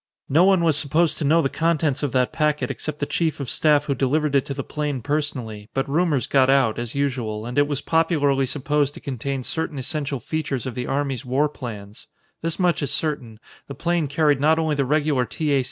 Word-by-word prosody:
No 160 +6 +5
one 190 -3 +4
was 160 -3 +3
supposed 155 +3 +1
to 155 - -1
know 165 +4 +4
the - - +2
contents 160 -2 0
of 145 -3 -1
that 125 -1 +1
packet 150 -1 0
except 150 -1 -5
the 145 - -2
Chief 160 0 -1
of 135 -4 -3
Staff 150 -2 +3
who 145 - 0
delivered 140 +3 0
it 140 -2 +3
to 140 - -3
the 135 - -3
plane 145 -5 -3
personally, 125 -8 -3
but 135 - 0
rumors 150 -2 +1
got 135 -1 +3
out, 130 -5 +3
as 120 +1 -4
usual, 125 -6 -2
and 120 +1 -5
it 145 0 +3
was 145 -2 -2
popularly 145 -5 +2
supposed 145 +1 0
to - - -9
contain 135 -1 -4
certain 160 +1 -3
essential 140 0 -3
features 140 -1 -3
of 130 - -4
the 125 +1 -4
Army's 135 -2 -1
war 135 +4 +1
plans. 110 -8 -9 0.3
This 165 0 -2
much 180 -3 +1
is 145 - -1
certain: 125 -8 -2 0.3
The 140 - -7
plane 170 +1 0
carried 145 0 +2
not 155 +2 +4
only 160 -1 +1
the 140 -2 0
regular 145 -2 +1
T. 155 -2 -2
A. 140 - +4
145 Hz, 220 wpm, -23 LUFS, 130-155 Hz, 0.3 s, No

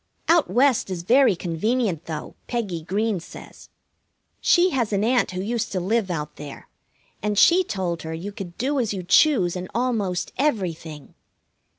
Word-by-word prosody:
Out 335 -1 +4
West 255 -4 +2
is 180 -3 -4
very 250 +1 +4
convenient, 180 +1 -1
though, 155 -2 -6
Peggy 205 -9 -3
Green 205 +4 -1
says. 165 - -13 0.7
She 360 +1 +4
has 240 -7 0
an 200 0 +1
aunt 245 +2 +2
who 185 0 -4
used 230 +2 -2
to 185 - 0
live 200 +2 0
out 150 -4 -4
there, 145 -1 -9 0.5
and 210 0 -1
she 355 - +6
told 180 - -3
her 160 - -6
you 170 +5 -5
could 185 -4 -9
do 275 +3 0
as 220 -4 -1
you 185 - -5
choose 190 - +4
in 180 0 -5
almost 220 -7 -1
everything. 170 - -2
200 Hz, 165 wpm, -23 LUFS, 175-240 Hz, 0.7 s, she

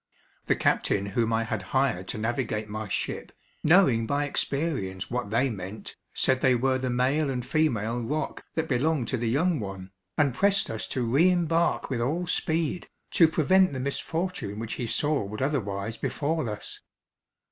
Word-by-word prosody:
The - - +3
captain 100 - +1
whom 115 +3 0
I 115 0 +2
had 110 -2 -3 0.2
hired 115 -9 +1
to - - -4
navigate 110 -1 -2
my 110 0 -5
ship, - - -3 0.3
knowing 150 -10 +5
by 145 +3 +1
experience 140 - -2
what 125 -4 -2
they 125 +4 +2
meant, 100 +1 -7 0.2
said 130 0 +2
they 130 -1 +4
were 130 +2 +1
the 130 0 -2
male 135 +5 +1
and 125 -2 -2
female 120 -6 +1
roc 145 +5 -3
that 160 0 0
belonged 135 -1 +1
to 130 - 0
the 115 -1 -1
young 160 +6 +2
one, 95 -2 -6 0.3
and 145 -4 +3
pressed 200 +7 +2
us 110 - -4
to 130 - -2
re 140 +10 +4
embark 170 -4 +1
with 120 -3 -1
all 155 +9 0
speed, 165 -1 -1 0.2
to 165 - +6
prevent 185 +3 +3
the 130 - -3
misfortune 140 - -3
which 115 0 -4
he 120 - -1
saw 150 +5 +1
would 105 +2 -6
otherwise 110 -6 -2
befall 155 -1 -1
us. 105 0 -6
130 Hz, 170 wpm, -27 LUFS, 110-155 Hz, 0.3 s, to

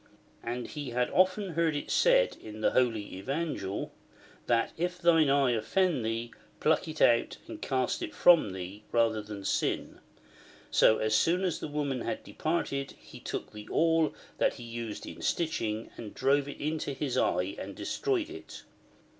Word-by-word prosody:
And 120 +1 -4
he 145 -3 -6
had 125 +1 0
often 185 +2 +3
heard 165 -1 +1
it 145 - -4
said - - +4
in 110 0 -9
the - - +3
Holy 115 -6 0
Evangel, 135 - -3 0.6
that 115 -1 +2
if 180 +2 -2
thine 165 -4 +4
eye 140 -2 +4
offend 130 - +1
thee, 115 +1 -3 0.3
pluck 160 +2 +2
it 155 0 0
out 115 -1 +3
and - - -8
cast 130 -2 0
it - - -5
from 170 - +6
thee, 95 +2 -7
rather 115 -2 +2
than 105 -2 -8
sin. - - -1 0.7
So, 110 - +5
as 110 0 0
soon 175 - +3
as 180 -4 0
the - - -4
woman 145 -4 -2
had - - -3
departed, 140 -4 -2
he - - -13
took - - -5
the 105 -1 -10
awl 165 -1 +2 0.2
that - - +2
he 120 - -9
used 115 -2 -6
in - - -9
stitching, 115 -9 -1
and 110 -3 -8
drove 140 +1 +2
it 145 - -8
into 150 -1 -2
his 135 -1 -2
eye 90 +2 +1
and - - -6
de - - -7
stroyed 390 -7 -1
it. 380 +1 -10
135 Hz, 170 wpm, -30 LUFS, 115-165 Hz, 0.7 s, from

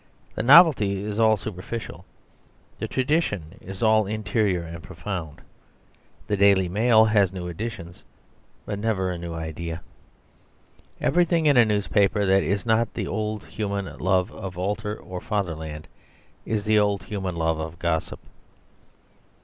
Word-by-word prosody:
The - - -3
novelty 120 - +6
is 105 +1 -4
all 110 -1 +4
superficial; 110 +3 -7 0.7
the - - -3
tradition 130 - -1
is 95 +4 -7
all 110 -2 +4
interior 105 -3 0
and 85 0 -8
profound. 85 -4 -6 0.8
The 105 - 0
DAILY 100 -2 +4
MAIL 110 +3 +4
has 105 -4 +3
new 90 -2 -6
editions, 90 -2 -7 0.6
but 100 -1 -4
never 100 -4 0
a 90 - -5
new 85 -1 -6
idea. 80 +1 -5 1.2
Everything 170 -2 +2
in 145 -2 +5
a 120 -2 +6
newspaper 105 -1 +1
that 95 0 +4
is 100 +2 -1
not 115 0 +2
the - - -2
old 110 -1 -3
human 100 -3 -4
love 95 +1 +1
of 95 -2 -8
altar 105 +3 -2
or 90 -1 -8
fatherland 80 -7 -4 0.6
is 110 -2 -1
the 110 0 +4
old 100 -2 +1
human 95 -3 -4
love 80 -1 0
of 80 +1 -6
gossip. 80 -2 -2
100 Hz, 140 wpm, -24 LUFS, 90-110 Hz, 1.2 s, novelty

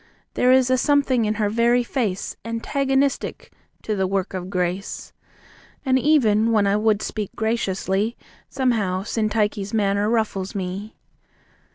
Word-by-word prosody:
There 250 - +3
is 260 -1 +4
a 255 - +3
something 275 -5 +2
in 215 +1 0
her 210 -1 0
very 235 +3 +2
face 225 -7 -2
Antagonistic 270 +4 -1 0.3
to 215 - -1
the 190 -1 0
work 195 0 -2
of 185 -1 -5
grace. 180 +1 -3 0.7
And 260 -1 +3
even 230 -7 +3
when 215 -3 +3
I 200 0 +2
would 215 0 +1
speak 210 -3 -4
graciously 215 -1 -1 0.3
Somehow, 220 -8 0
Syntyche's 210 -1 -1
manner 205 0 +1
ruffles 215 -5 -1
me. 195 +3 -5
215 Hz, 135 wpm, -22 LUFS, 195-245 Hz, 0.7 s, is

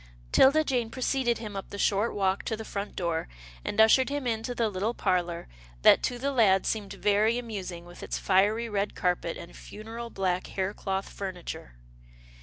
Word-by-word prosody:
'Tilda 305 +4 +6
Jane 250 -6 0
preceded 255 -1 0
him 215 -3 -7
up 195 - -6
the 200 - -7
short 205 +3 +1
walk 195 -1 +1
to 220 - -2
the 220 - -7
front 200 0 -5
door, 170 -3 -1 0.4
and - - -3
ushered 225 +5 +6
him 285 -1 -3
into 230 +1 -2
the 230 -2 +1
little 210 +4 -2
parlour, 175 -3 -1 0.4
that - - +7
to 245 - -1
the 275 +3 -1
lad 205 -7 +4
seemed 205 -3 -2
very 210 +3 +2
amusing 190 -8 -5
with 175 0 -12
its - - -3
fiery 205 +5 +2
red 205 -2 -2
carpet, 180 -2 -1
and 170 - -10
funereal 225 +2 -8
black 185 -3 -1
haircloth 195 0 -2
furniture. 180 - -7
210 Hz, 175 wpm, -28 LUFS, 190-235 Hz, 0.4 s, that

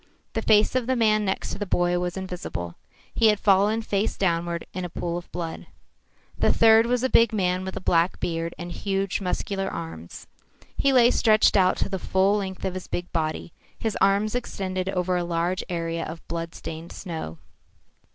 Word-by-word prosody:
The 225 - -1
face 215 -1 +4
of 255 -2 0
the 260 - +2
man 215 -3 +3
next 190 - -2
to - - -5
the 205 - -2
boy 175 0 +1
was 180 +1 -3
invisible. 175 - -5 0.4
He 225 - +4
had 210 -1 +3
fallen 205 +3 +3
face 205 -1 -1
downward 170 -2 0
in 185 - -4
a 180 - -4
pool 170 +1 -3
of 175 0 -7
blood. 170 -2 -5 0.7
The - - +3
third 225 0 +6
was 245 0 +1
a - - +3
big 230 -3 +4
man 185 -3 0
with 190 0 -5
a - - -5
black 170 0 +2
beard 165 0 -2
and 175 0 -6
huge, 195 +1 -2
muscular 195 +1 -2
arms. 125 - -7 0.5
He 275 - +2
lay 245 -2 +6
stretched 215 -2 +4
out 185 -2 +4
to - - 0
the 195 -1 -3
full 195 +3 +2
length 190 -2 -4
of 190 - -1
his 185 -1 -6
big 175 0 -4
body, 160 0 -2 0.2
his 220 -2 -2
arms 200 +2 +3
extended 190 -6 -3
over 180 -1 0
a 175 - -1
large 170 +2 -1
area 165 -1 -2
of 160 +1 -8
blood 165 0 -4
stained 165 +1 -7
snow. 160 - -6
185 Hz, 190 wpm, -25 LUFS, 170-210 Hz, 0.7 s, third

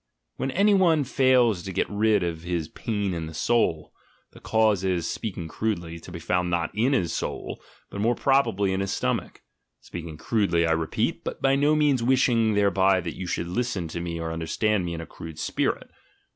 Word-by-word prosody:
When - - -2
any 200 +8 +3
one 170 -6 +4
fails 130 -7 +3
to 95 - -6
get - - 0
rid 105 -1 +2
of 85 -2 -2
ihis 85 -2 -4
"pain 105 -4 -2
in 80 -2 -4
the 80 - -9
soul," 80 -4 +1 0.4
the - - -15
cause 110 -4 +2
is, 90 -3 0
speaking 95 -7 -4
crudely, 85 -3 -3
to 85 - -12
be 85 - -6
found 90 +2 0
not 85 -1 0
in 120 +7 +2
his 85 -10 +1
"soul" - - -4 0.3
but 100 - -4
more 120 +3 +2
probably 105 -9 +2
in 95 - -1
his 100 0 -2
stomach - - -2 0.4
(speaking 85 -2 -8
crudely, 95 -4 +1
I 80 - +1
repeat, 80 -1 -1
but - - -5
by 135 0 +3
no 145 +2 +3
means 145 -4 +3
wishing 120 -3 +3
thereby 95 -1 +3
that 85 -2 -5
you 95 - -5
should 85 0 -2
listen 100 -2 -2
to 85 - -4
me 85 -1 -4
or 80 0 -3
under 80 0 -4
stand 105 0 +1
me 85 -1 -3
in 80 - -5
a - - -7
crude 80 -1 -10
spirit). 80 - -2
95 Hz, 200 wpm, -25 LUFS, 85-115 Hz, 0.4 s, one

